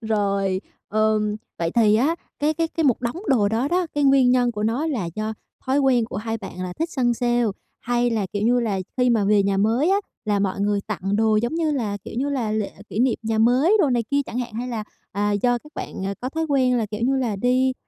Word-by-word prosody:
Rồi, 200 -4 0 0.3
ờm, 215 0 +1 0.2
vậy 165 -1 0
thì 215 -3 +4
á 280 +9 +2 0.2
cái 305 +2 +1
cái 330 +1 0
cái 325 - -2
một 255 -5 +3
đống 240 +5 -2
đồ 215 -6 +3
đó 235 +6 0
đó, 355 0 +1
cái 290 -1 +1
nguyên 270 -2 +5
nhân 245 -1 +3
của 210 -1 -4
nó 240 +9 0
là 235 - -2
do 215 +1 -2 0.3
thói 265 +2 +2
quen 260 -4 +3
của - - -7
hai 225 +2 -3
bạn 190 -3 -8
là 180 - -4
thích 325 +1 -1
săn 245 -5 +1
sale, 240 0 +1 0.4
hay 240 0 +1
là, 215 -4 0
kiểu 205 0 -2
như 245 +2 +3
là, 205 -5 -1 0.2
khi 250 -1 +3
mà 220 -4 +2
về 205 0 +4
nhà 195 0 +1
mới 230 - +2
á 390 - +4 0.3
là 205 -1 +1
mọi 195 0 -1
người 205 0 +1
tặng 200 -1 -2
đồ, 220 -1 +3
giống 240 +7 0
như 330 -2 +1
là, 220 -8 -1
kiểu - - -8
như 280 - 0
là, 255 -6 -1
lễ 215 -2 -2 0.2
kỷ 210 - -5
niệm 250 -1 +2
nhà 220 0 -1
mới 255 - +4
đồ 295 - +3
này 240 -2 +2
kia 280 - +2
chẳng 235 - -4
hạn? 240 -2 -4
Hay 245 +2 -3
là, 225 -3 -3 0.3
à, 205 +1 0
do 240 +4 +2
các 300 +5 -18
bạn, 190 - -5
ờ, 195 - -2
có 255 - -3
thói 320 +4 -2
quen 255 -3 +3
là, 225 -3 0
kiểu 210 +1 -6
như 265 +3 +2
là, 235 -6 -1
đi, 255 +4 +2
235 Hz, 255 wpm, -23 LUFS, 210-260 Hz, 0.4 s, nguyên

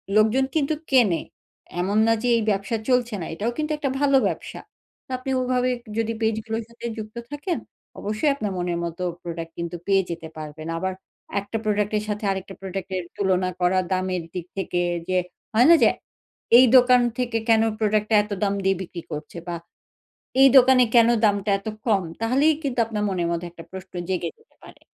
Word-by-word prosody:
লোকজন 220 +5 +4
কিন্তু 310 0 +1 0.2
কেনে। 230 -11 +4 0.6
এমন 200 +3 0
না 225 - +5
যে 245 - +1
এই - - 0
ব্যবসা 200 +3 0
চলছে 245 -3 +2
না, - - -4
এটাও 210 +8 -2
কিন্তু 310 0 -2
একটা 290 -2 -1
ভালো 280 -1 +4
ব্যবসা। - - -5 0.5
তো - - -69
আপনি 255 +1 -7
ওইভাবে 255 0 +1 0.3
যদি 225 0 0
পেজগুলোর 220 +1 -1
সাথে 235 0 -11
যুক্ত 215 0 -7 0.2
থাকেন, 295 +4 -2 0.4
অবশ্যই 215 +9 0
আপনার 215 -7 -3
মনের 175 -1 -1
মতো 170 +2 -5 0.2
প্রোডাক্ট 165 -1 -6
কিন্তু 170 +1 -4
পেয়ে 195 -1 +4
যেতে 165 -1 -5
পারবেন। 155 +1 -7
আবার 190 +2 -2 0.5
একটা 200 +3 -4
প্রোডাক্টের 210 0 0
সাথে 210 +1 -3
আরেকটা 195 0 -5
প্রোডাক্টের 190 -1 -4
তুলনা 185 -2 +1
করা 180 +1 +3
দামের 185 -2 -1
দিক 180 -2 -4
থেকে 180 -2 -1 0.3
যে 185 - +2 0.4
হয় 235 +5 +5
না? 340 - +9
যে - - +7 0.7
এই 255 - +8
দোকান 250 0 +6 0.2
থেকে 240 -2 -1
কেন 225 -1 +6 0.2
প্রোডাক্টটা 215 0 +2
এত 210 - -12
দাম 200 -1 +2
দিয়ে 195 0 +3
বিক্রি 175 -1 -7
করছে 150 +3 -6
বা, 175 - -3 0.9
এই 270 - +9
দোকানে 255 0 +7
কেন 230 -1 +7 0.2
দামটা 205 0 +1
এত 195 - -11 0.2
কম? 200 -4 +3 0.2
তাহলেই 270 +7 +3
কিন্তু 265 -4 -2
আপনার 215 -2 -3
মনের 180 -3 -1
মধ্যে 170 +1 -2
একটা 165 -1 -11
প্রশ্ন 190 0 -10 0.2
জেগে 180 -2 -1
যেতে - - -29
পারে। - - -15
210 Hz, 180 wpm, -24 LUFS, 185-240 Hz, 0.9 s, না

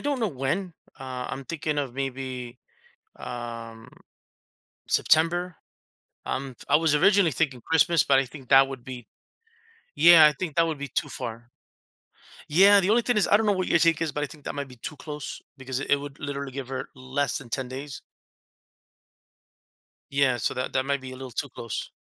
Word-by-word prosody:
don't 285 -2 -1
know 225 - +2
when. 170 +6 -2 0.3
Uh, 130 -2 -5
I'm 135 - -6
thinking 155 0 -3
of 135 -4 -3
maybe, 130 -2 -5 0.6
um, 115 -1 -7 1.0
September. 175 +3 +2 0.7
Um, 135 -1 -4
I - - +6
was 160 -2 +2
originally 195 +2 +4
thinking 135 -3 -1
Christmas, 160 +3 +3
but 135 -1 +4
I 135 - 0
think 130 0 -13
that 135 0 +7
would 135 -3 -8
be 125 -2 -8 0.9
Yeah, 170 -2 +8
I 150 - +6
think 155 0 -5
that 165 - +4
would 160 -2 -3
be 145 0 -5
too - - -2
far. 120 -1 -7 1.0
Yeah, 200 +6 +7
the 185 - 0
only 230 +3 +4
thing 245 -2 +1
is 205 - +2
I - - +7
don't 220 - 0
know 210 - +3
what 185 -2 -1
your - - +4
take 165 -1 +3
is, 165 -2 0
but 150 0 -2
I - - -2
think 150 -1 -15
that - - -4
might 140 -1 -4
be 125 - -13
too 135 +5 -7
close 150 -1 -7 0.2
because 130 0 -4
it - - -5
it 145 - +6
would 140 0 -8
literally 140 -1 -5
give 135 -1 -6
her 130 0 -5
less 130 0 -2
than 135 -6 -8
10 130 +1 -3
days. 135 +2 -7 2.1
Yeah. 135 -2 +2
So, - - -1
that 130 - -3
that 130 - +1
might 140 0 0
be 130 0 -8
a - - -8
little 130 0 -8
too 140 +5 -3
close. 115 -2 -6
140 Hz, 195 wpm, -26 LUFS, 130-160 Hz, 2.1 s, Yeah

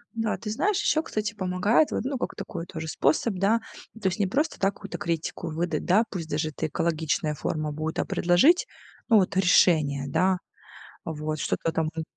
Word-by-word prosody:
Да, 225 -1 -1
ты 210 - -6
знаешь, 370 - +1
ещё, 315 +1 +2
кстати, 215 -4 -3
помогает 195 +8 +2
вот, - - -1
ну, 270 +1 -2
как - - -4
такой 170 0 -6
тоже 160 -1 -6
способ, 195 +7 +1
да. 200 +5 +2 0.4
То 195 - +1
есть 180 +1 -1
не 200 - +2
просто, 295 - -1
да, 195 0 +2
какую-то 200 -1 -8
критику 170 0 -3
выдать, 170 +2 -2
да, 200 +5 +4
пусть 170 -5 -5
даже 155 +1 -1
это 155 - -3
экологичная 160 0 -1
форма 155 +1 -2
будет, 155 +2 -3
а - - +1
предложить, 275 - +4 0.4
ну 225 - +6
вот 190 -1 +2
решение, 155 -7 +4
да. 185 +6 +2 0.7
Вот 155 -1 -3
что-то 165 - -1
там, 160 -1 0
ну 160 - -2
180 Hz, 185 wpm, -26 LUFS, 160-210 Hz, 0.7 s, ну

